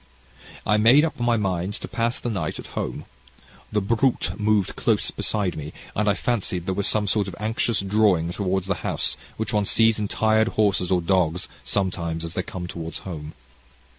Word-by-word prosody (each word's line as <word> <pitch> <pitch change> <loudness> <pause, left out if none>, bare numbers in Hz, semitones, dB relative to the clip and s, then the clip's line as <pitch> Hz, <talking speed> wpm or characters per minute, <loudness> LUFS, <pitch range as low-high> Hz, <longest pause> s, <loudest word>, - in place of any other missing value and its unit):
"I 105 - +3
made 120 +8 +6
up 160 - -4
my 120 -1 +2
mind 95 -1 -1
to - - -6
pass 115 +1 -1
the 120 - -3
night 100 - -2
at - - -10
home. - - -4 0.7
The 105 -1 +1
brute 115 +6 +1
moved 105 -3 +1
close - - +1
beside 100 -6 -1
me, 75 0 -6 0.2
and 105 0 +2
I 100 - +3
fancied 100 -7 -1
there 95 - 0
was 100 +1 +1
the 105 -1 +1
sort 100 0 +1
of 95 - -6
anxious 110 0 0
drawing 100 -4 +2
toward 95 0 -1
the 95 +1 0
house, - - -1 0.2
which 110 - -2
one 105 -1 +2
sees 115 +1 +3
in 105 - -1
tired 110 +1 +2
horses 100 -4 +3
or 90 -2 +2
dogs, 90 -1 +1 0.2
sometimes 85 -4 -1
as 85 - -6
they - - -1
come 90 -1 -6
toward 85 -1 -6
home. 80 -4 -7
100 Hz, 190 wpm, -24 LUFS, 90-110 Hz, 0.7 s, made